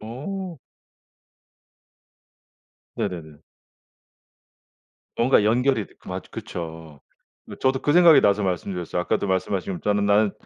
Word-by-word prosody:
어. 165 - -6 2.4
네네네. 80 -6 -5 1.8
뭔가 120 -2 +4
연결이 120 +1 +2
되 - - -22
맞 - - -6
그쵸. 80 -3 -8 0.4
네 - - -10
저도 130 0 +1
그 145 - +1
생각이 170 -2 +7
나서 100 +1 +2
말씀드렸어요. 90 -1 -2
아까도 95 - -1
말씀하시고 95 -1 -2
저는 105 0 0
"나는 100 0 +3
100 Hz, 230 characters per minute, -23 LUFS, 90-130 Hz, 2.4 s, 생각이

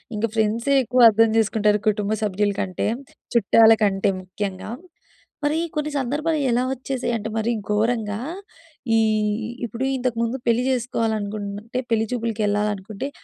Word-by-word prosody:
ఇంక 210 +2 0
ఫ్రెండ్సే 225 +5 +1
ఎక్కువ 250 +1 +2
అర్థం 225 +1 +4
జేసుకుంటారు, 210 -1 +2
కుటుంబ 210 0 -1
సభ్యుల 205 0 +1
కంటే. 185 +1 -2 0.5
చుట్టాలకంటే 215 -3 +4
ముఖ్యంగా. 190 +2 -5 0.7
మరి 300 +2 +1 0.2
కొన్ని 300 0 -1
సందర్భాలు 300 +5 -1
ఎలా 240 +1 +2
వచ్చేసాయి 260 -1 -3
అంటే 220 0 -5
మరీ 220 +2 0 0.2
ఘోరంగా, 215 -1 0 0.8
ఈహ్, 215 0 +1 0.2
ఇప్పుడు 235 +2 -5
ఇంతకు 245 -2 -2
ముందు 235 +3 -1
పెళ్లి 235 +1 +3
జేసుకోవాలనుకుంటే, 220 -2 -2
పెళ్లి 225 -1 +2
చూపులకి 225 -3 -2
యెళ్ళాలనుకుంటే 210 +4 -2
220 Hz, 120 wpm, -23 LUFS, 210-240 Hz, 0.8 s, అర్థం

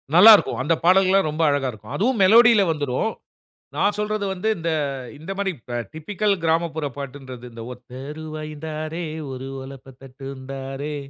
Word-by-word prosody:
நல்லா 210 +6 +10
இருக்கும். 195 - -1
அந்த 150 +5 +2
பாடல்கள்லாம் 190 0 +4
ரொம்ப 155 +2 -3
அழகா 140 -2 +1
இருக்கும். 110 -1 -11
அதுவும் 235 +3 +1
மெலோடில 225 +2 +7
வந்துரும். 145 - -1 0.6
நான் 205 0 +2
சொல்றது 210 0 -1
வந்து, 190 +4 -2
இந்த 165 0 -2 0.5
இந்த 160 +6 -7
மாரி 200 -1 0 0.4
டிபிக்கல் 200 +6 0
கிராமப்புற 160 -1 0
பாட்டுன்றது, 130 -3 -8
இந்த 115 0 -9
"ஒத்த 125 0 -19 0.3
ருவாயுந் 155 -1 -7
தாரேன், 155 +1 -4 0.2
ஒரு 130 +1 -6 0.2
ஒலப்ப 135 0 -11
தட்டுந்தாரே, 135 +2 -7
155 Hz, 140 wpm, -23 LUFS, 135-190 Hz, 0.6 s, நல்லா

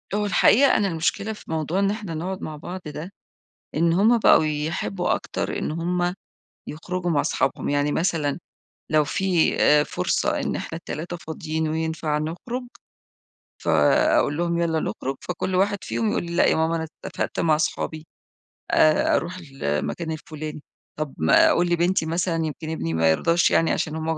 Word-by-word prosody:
هو 210 0 0
الحقيقة 250 +6 +5
أنا 205 - +1
المشكلة 180 +5 -1
في 210 - -12
موضوع 160 +3 -1
إن 200 0 +2
إحنا 210 -5 -5
نقعد 185 +4 -4
مع 155 - -5
بعض 175 +5 -7
ده، 150 +4 -7 0.6
إن 165 +2 +3
هم 215 +7 +4
بقوا 210 - +6
يحبّوا 160 +4 -1
أكتر - - -4
إن - - -2
هم 175 +2 -1 0.6
يخرجوا 175 +3 -3
مع 145 -3 +2
صحابهم. 135 - -1
يعني 145 +1 +1
مثلًا، 160 -4 0 0.5
لو 155 -1 +4
في 180 +2 +1
آآ 150 0 +5
فرصة 90 - -1
إن - - -2
إحنا 165 - -5
ال3 170 +1 -6
فاضيين 160 -1 -3
وينفع 160 -1 -1
نخرج، 180 +12 -4 1.0
فأقول 145 - +3
لهم: 170 0 0
"يالّا 165 -2 +1
نخرُج." 135 -3 -3
فكل 180 +1 -3
واحد 200 +2 +2
فيهم 225 - -1
يقول - - -1
لي: 170 0 -5
"لأ - - +4
يا - - +3
ماما، 160 +1 +1
أنا 160 -1 -3 0.2
اتفقت - - -3
مع 160 -2 +3
صحابي، 155 0 -2 0.7
آآ 155 0 +4
أروح 175 +2 -2
المكان 135 - -2
الفلاني." 155 -1 -6 0.4
طب 155 -3 -3
ما 80 0 +5
أقول 175 +1 +2
لبنتي 175 0 +2
مثلًا، 170 +2 -1
يمكن 155 +1 -5
ابني 80 - -3
ما 80 0 +3
يرضاش 165 - +2
يعني 165 - +3
عشان 155 - -1
هم 160 0 -1
ب - - -7
160 Hz, 165 wpm, -24 LUFS, 155-180 Hz, 1.0 s, بقوا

